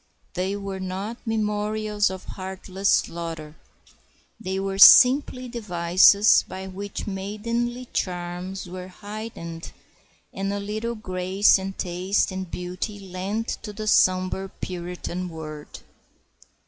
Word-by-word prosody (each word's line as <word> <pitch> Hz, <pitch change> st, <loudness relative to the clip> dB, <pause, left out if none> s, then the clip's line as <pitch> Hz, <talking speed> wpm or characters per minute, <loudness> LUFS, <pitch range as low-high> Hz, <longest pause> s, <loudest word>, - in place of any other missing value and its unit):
They 185 Hz, +2 st, -1 dB
were 195 Hz, -1 st, -5 dB
not 190 Hz, +5 st, -4 dB
memorials 210 Hz, -1 st, 0 dB
of 190 Hz, -1 st, -7 dB
heartless 190 Hz, +1 st, -4 dB
slaughter. 165 Hz, -2 st, -1 dB, 0.8 s
They 190 Hz, +1 st, -3 dB
were 195 Hz, 0 st, -3 dB
simply 255 Hz, +3 st, +8 dB
devices 200 Hz, -2 st, +5 dB
by 190 Hz, 0 st, -7 dB
which 195 Hz, +2 st, -6 dB
maidenly 230 Hz, +5 st, -3 dB
charms 180 Hz, +1 st, -3 dB
were 180 Hz, +1 st, -7 dB
heightened, 200 Hz, -4 st, -8 dB, 0.6 s
and 195 Hz, +1 st, -2 dB
a 200 Hz, -, -2 dB
little 215 Hz, +3 st, -3 dB
grace 190 Hz, -1 st, +2 dB
and 190 Hz, 0 st, -6 dB
taste 185 Hz, +3 st, 0 dB
and 185 Hz, -1 st, -5 dB
beauty 180 Hz, +4 st, -5 dB
lent 195 Hz, +4 st, -4 dB
to 210 Hz, -, -6 dB
the 215 Hz, +1 st, -6 dB
sombre 185 Hz, -1 st, +2 dB
Puritan 180 Hz, 0 st, -5 dB
world. 155 Hz, -2 st, -9 dB
190 Hz, 110 wpm, -24 LUFS, 180-210 Hz, 0.8 s, simply